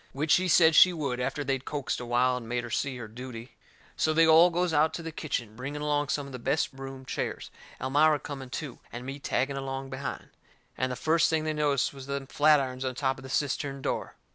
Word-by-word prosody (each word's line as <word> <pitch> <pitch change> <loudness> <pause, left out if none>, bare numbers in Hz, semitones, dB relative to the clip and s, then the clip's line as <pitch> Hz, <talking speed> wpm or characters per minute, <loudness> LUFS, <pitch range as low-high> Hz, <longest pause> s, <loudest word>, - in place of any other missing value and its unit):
Which 150 +3 -1
she 185 +1 +4
said 160 -1 +6
she 180 +3 +8
would 140 -7 -2
after 145 +3 -2
they'd 135 -1 -1
coaxed 140 -3 -3
a 125 - -6
while 125 +1 +2
and 120 -3 -6
made 120 0 -1
her 120 - -7
see 135 +1 -1
her 115 -3 -7
duty. 120 +1 -9 0.4
So 155 - +1
they 165 +1 +6
all 160 +2 +7
goes 175 0 0
out 155 +1 +3
to 170 - -6
the 165 - -5
kitchen, 125 -9 -4
bringing 140 +5 -5
along 145 -1 +1
some 145 0 -1
of 140 - -10
the 125 - -7
best 150 +6 0
room 135 0 -8
chairs, - - -4 0.3
Elmira 150 +3 +3
coming 135 -3 -7
too, 135 -1 -6
and 120 +1 -7
me 135 +2 -6
tagging 135 0 -1
along 135 0 -5
behind. 130 +1 -5 0.5
And 130 +1 -1
the - - -2
first 160 +4 +2
thing 160 -1 +1
they 155 0 -1
noticed 145 -3 +1
was 135 -1 -10
them 140 -1 -3
flatirons 135 -3 +2
on 130 -1 -2
top 135 0 -1
of - - -12
the 130 - -9
cistern 140 0 -1
door. - - -3
135 Hz, 230 wpm, -28 LUFS, 130-150 Hz, 0.5 s, she